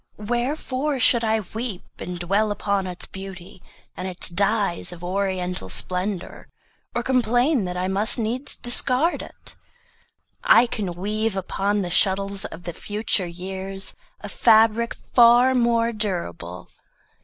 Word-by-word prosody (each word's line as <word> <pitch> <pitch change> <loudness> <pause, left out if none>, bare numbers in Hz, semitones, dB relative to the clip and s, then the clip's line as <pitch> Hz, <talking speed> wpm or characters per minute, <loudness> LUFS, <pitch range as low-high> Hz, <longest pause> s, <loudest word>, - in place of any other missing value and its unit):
Wherefore 255 +5 -2
should 235 -1 +4
I 220 0 +1
weep 215 0 -6 0.2
And 180 0 -5
dwell 195 +5 0
upon 200 -2 -1
its 180 0 -4
beauty, 190 -2 -10 0.3
and 185 - -5
its 185 0 0
dyes 200 0 0
Of 175 -1 -11
oriental 180 - -1
splendor, 185 - -1 0.5
or 240 - -1
complain 245 0 +2
That 180 0 -4
I 180 +1 -1
must 200 +6 +3
needs 240 +4 -1
discard 255 +6 +1
it? - - -11 0.9
I 245 - +6
can 205 -6 -4
weave 210 +3 -2
Upon 200 +2 -1
the 175 - -4
shuttles 195 +2 +2
of 165 - -9
the 175 - -6
future 205 -1 -1
years 190 +2 -4 0.3
A - - -7
fabric 225 0 +3 0.2
far 240 +2 +6
more 235 -2 +2
durable. 90 - -4
200 Hz, 130 wpm, -23 LUFS, 185-235 Hz, 0.9 s, I